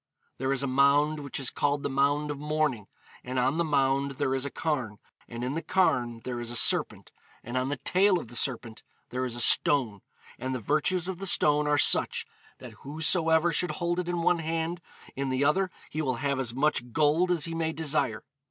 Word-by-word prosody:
'There 130 Hz, 0 st, -1 dB
is 135 Hz, 0 st, 0 dB
a -, -, -1 dB
mound, 140 Hz, +3 st, +3 dB
which 140 Hz, -2 st, -5 dB
is 135 Hz, -, 0 dB
called 145 Hz, 0 st, -1 dB
the -, -, 0 dB
Mound 140 Hz, +2 st, 0 dB
of 145 Hz, -, -6 dB
Mourning; 150 Hz, -8 st, -1 dB, 0.4 s
and 130 Hz, +1 st, -5 dB
on 130 Hz, +6 st, +1 dB
the -, -, +3 dB
mound 140 Hz, -2 st, +1 dB
there 130 Hz, 0 st, -1 dB
is 135 Hz, 0 st, -2 dB
a -, -, -3 dB
carn, 130 Hz, -10 st, -3 dB, 0.3 s
and 120 Hz, 0 st, -7 dB
in 130 Hz, +2 st, -2 dB
the 165 Hz, -, -3 dB
carn 125 Hz, -10 st, 0 dB
there 125 Hz, -1 st, -4 dB
is 120 Hz, -1 st, -5 dB
a 120 Hz, -, -5 dB
serpent, -, -, +1 dB, 0.3 s
and 120 Hz, +2 st, -7 dB
on 130 Hz, +1 st, 0 dB
the 145 Hz, -, -2 dB
tail 185 Hz, +8 st, +2 dB
of -, -, -9 dB
the 120 Hz, -, -12 dB
serpent 120 Hz, -3 st, -4 dB, 0.3 s
there 130 Hz, +1 st, -2 dB
is 120 Hz, -2 st, -5 dB
a -, -, -4 dB
stone, 120 Hz, -4 st, +3 dB, 0.4 s
and 130 Hz, 0 st, -3 dB
the -, -, -3 dB
virtues 170 Hz, -, 0 dB
of 185 Hz, -2 st, -5 dB
the 195 Hz, -, -3 dB
stone 150 Hz, -3 st, +4 dB
are 150 Hz, 0 st, +2 dB
such, -, -, +3 dB, 0.3 s
that -, -, -11 dB
whosoever 160 Hz, +3 st, +1 dB
should 180 Hz, +3 st, 0 dB
hold 175 Hz, 0 st, -2 dB
it 180 Hz, -1 st, -3 dB
in 175 Hz, -1 st, -2 dB
one 175 Hz, 0 st, +2 dB
hand, 165 Hz, +2 st, -3 dB, 0.3 s
in 135 Hz, 0 st, -2 dB
the 130 Hz, +2 st, 0 dB
other 185 Hz, +6 st, +2 dB, 0.2 s
he 155 Hz, -, -2 dB
will 130 Hz, -4 st, -1 dB
have 140 Hz, +2 st, -2 dB
as 125 Hz, -4 st, -2 dB
much 125 Hz, -2 st, 0 dB
gold 155 Hz, +6 st, +2 dB
as 175 Hz, -4 st, +1 dB
he 165 Hz, -, -5 dB
may 165 Hz, -1 st, -1 dB
desire. 150 Hz, -8 st, -1 dB
145 Hz, 215 wpm, -27 LUFS, 130-160 Hz, 0.4 s, stone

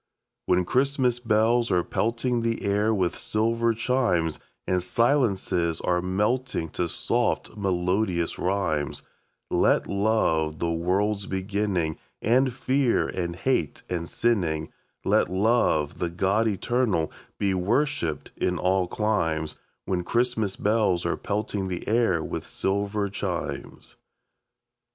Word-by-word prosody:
When 90 Hz, 0 st, +3 dB
Christmas 130 Hz, 0 st, +1 dB
bells 115 Hz, +1 st, +2 dB
are 90 Hz, -1 st, +2 dB
pelting 120 Hz, +4 st, 0 dB
the 115 Hz, 0 st, -1 dB
air 105 Hz, +2 st, +2 dB
with 95 Hz, -5 st, 0 dB
silver 115 Hz, +1 st, 0 dB
chimes, 115 Hz, -10 st, +1 dB, 0.3 s
And 90 Hz, -1 st, +1 dB
silences 100 Hz, -, +1 dB
are 90 Hz, -1 st, +1 dB
melting 105 Hz, +1 st, -1 dB
to 85 Hz, +2 st, -2 dB
soft, -, -, -1 dB
melodious 90 Hz, -2 st, 0 dB
rhymes, 90 Hz, -6 st, -1 dB, 0.5 s
Let -, -, +3 dB
Love, 100 Hz, -7 st, +1 dB
the 85 Hz, +1 st, -1 dB
world's 100 Hz, +5 st, 0 dB
beginning, 95 Hz, -4 st, -1 dB, 0.2 s
End 130 Hz, +4 st, +3 dB
fear 130 Hz, 0 st, +1 dB
and 85 Hz, -2 st, -3 dB
hate 85 Hz, -, -1 dB
and 85 Hz, -2 st, -2 dB
sinning; 85 Hz, -10 st, 0 dB, 0.4 s
Let -, -, +3 dB
Love, 95 Hz, -7 st, +2 dB
the 85 Hz, -, 0 dB
God 95 Hz, +6 st, +1 dB
Eternal, 105 Hz, -4 st, 0 dB, 0.3 s
be 100 Hz, -2 st, +1 dB
worshipped 95 Hz, -, 0 dB
in 90 Hz, 0 st, 0 dB
all 90 Hz, +2 st, +1 dB
climes 80 Hz, -8 st, 0 dB, 0.3 s
When 90 Hz, -2 st, 0 dB
Christmas 115 Hz, -1 st, 0 dB
bells 105 Hz, -5 st, +1 dB
are -, -, +1 dB
pelting 100 Hz, -1 st, -2 dB
the 90 Hz, -2 st, -5 dB
air 110 Hz, -8 st, +2 dB
with -, -, -5 dB
silver 100 Hz, +1 st, -1 dB
chimes. 95 Hz, -3 st, -5 dB
100 Hz, 120 wpm, -26 LUFS, 90-115 Hz, 0.5 s, When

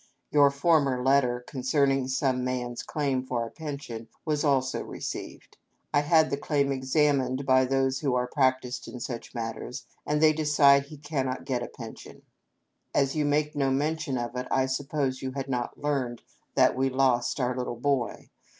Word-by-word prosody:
Your 145 Hz, -1 st, +6 dB
former 140 Hz, -3 st, +2 dB
letter, 130 Hz, -2 st, +3 dB
concerning 135 Hz, 0 st, +1 dB
some 130 Hz, -1 st, 0 dB
man's 125 Hz, -1 st, -3 dB
claim 140 Hz, -4 st, -1 dB
for 125 Hz, -2 st, -2 dB
a 115 Hz, -, -9 dB
pension, 140 Hz, -7 st, -7 dB, 0.2 s
was 150 Hz, -2 st, 0 dB
also 135 Hz, -3 st, +1 dB
received. -, -, -7 dB, 0.4 s
I -, -, +5 dB
had 155 Hz, +2 st, +3 dB
the 140 Hz, -, 0 dB
claim 140 Hz, -1 st, 0 dB
examined 135 Hz, -1 st, +1 dB
by 130 Hz, -1 st, +4 dB
those 135 Hz, 0 st, +1 dB
who 135 Hz, -4 st, 0 dB
are 125 Hz, 0 st, +1 dB
prac 130 Hz, -1 st, +2 dB
tised 125 Hz, 0 st, -6 dB
in 125 Hz, -, -8 dB
such 120 Hz, +1 st, -6 dB
matters, 120 Hz, +2 st, -5 dB, 0.2 s
and 150 Hz, 0 st, 0 dB
they 155 Hz, 0 st, +6 dB
decide 145 Hz, -2 st, +4 dB
he 150 Hz, -, -10 dB
cannot 135 Hz, -3 st, -3 dB
get 125 Hz, -3 st, -1 dB
a 120 Hz, -, -4 dB
pen 115 Hz, -3 st, -9 dB
sion. -, -, -14 dB, 0.4 s
" -, -, -25 dB
As 135 Hz, 0 st, +2 dB
you 150 Hz, -1 st, +1 dB
make 150 Hz, +1 st, +1 dB
no 140 Hz, -2 st, +1 dB
mention 150 Hz, +1 st, -1 dB
of 120 Hz, 0 st, -4 dB
it, 125 Hz, 0 st, -3 dB
I 130 Hz, 0 st, +2 dB
suppose 135 Hz, 0 st, -2 dB
you 130 Hz, -1 st, -4 dB
had 135 Hz, 0 st, -4 dB
not 125 Hz, -2 st, -3 dB
learned 135 Hz, -5 st, -2 dB, 0.3 s
that -, -, +4 dB
we 135 Hz, +1 st, +1 dB
lost 130 Hz, 0 st, +1 dB
our 125 Hz, -1 st, 0 dB
little 125 Hz, -2 st, -4 dB
boy. 130 Hz, -4 st, -1 dB
135 Hz, 180 wpm, -27 LUFS, 125-145 Hz, 0.4 s, Your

